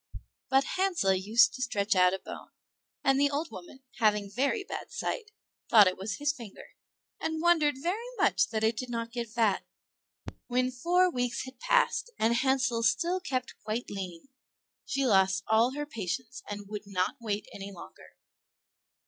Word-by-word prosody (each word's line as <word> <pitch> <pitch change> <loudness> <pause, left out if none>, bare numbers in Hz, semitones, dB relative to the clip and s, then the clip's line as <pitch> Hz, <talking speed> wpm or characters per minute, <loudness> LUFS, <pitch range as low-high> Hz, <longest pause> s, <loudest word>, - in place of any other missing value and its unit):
But 270 0 +4
Hansel 360 - +2
used 225 +5 +4
to 255 - -7
stretch 205 -5 0
out 180 0 +5
a 190 - -1
bone, - - -10 0.5
and 270 -1 +3
the 285 - +4
old 290 0 -3
woman, 195 +7 -11 0.2
having 210 -2 +2
very 280 - 0
bad - - -7
sight, 475 -2 -3 0.4
thought 215 -3 +8
it 185 -1 +1
was 195 +3 -4
his 295 0 +1
finger, 230 -8 -11 0.5
and 320 0 -2
wondered 320 -4 +3
very 390 - -2
much - - +3
that 220 -1 -2
it 220 0 +2
did 255 +1 -4
not 230 -1 -3
get 235 -1 -4
fat. 220 -3 +1 0.8
When 255 +1 +1
four 355 +8 +2
weeks 245 -1 -2
had 260 -1 -12
passed, - - +2
and 225 +1 +2
Hansel 260 -1 +1
still 345 +9 +2
kept 260 -9 -4
quite 220 +3 -3
lean, 185 +2 -7 0.6
she 275 0 0
lost 190 -4 +3
all 225 +4 +3
her 295 0 -3
patience 230 - -5
and 205 -1 -6
would 210 0 -7
not 185 +5 -1
wait 210 -2 -2
any 200 0 -7
longer. 180 - -13
240 Hz, 165 wpm, -29 LUFS, 205-285 Hz, 0.8 s, thought